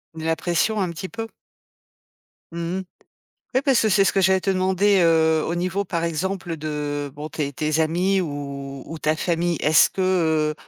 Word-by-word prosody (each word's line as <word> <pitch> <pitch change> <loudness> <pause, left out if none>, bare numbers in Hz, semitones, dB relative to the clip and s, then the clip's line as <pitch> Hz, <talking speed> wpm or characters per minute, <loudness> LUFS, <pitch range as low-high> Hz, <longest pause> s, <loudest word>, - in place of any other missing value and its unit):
La 160 0 -1
pression 185 +6 0
un 185 - 0
petit 170 +2 -6
peu? 225 +2 -6 1.2
Mmh 170 +2 -3
mh. - - -5 0.7
Ouais 260 - +4
parce 270 -4 +3
que 220 - +2
c'est 195 0 +4
ce 175 - +2
que 195 - +2
j'allais 190 +1 +3
te 195 - +1
demander, 190 +1 +2
heu, 160 -1 +3
au 170 - -2
niveau 185 +3 -1
par 170 -3 -3
exemple 170 +1 -2
de, 155 0 -6 0.4
heu, - - -10
bon, 150 +3 -7
tes 145 -3 -3
tes 155 +2 -1
amis 180 +5 +1
ou 140 -3 -6
ou 165 +1 -8
ta 155 +1 +1
famille. 170 +1 0
Est-ce, 155 +1 +5
heu, 160 -5 +2
170 Hz, 185 wpm, -23 LUFS, 155-190 Hz, 1.2 s, Est-ce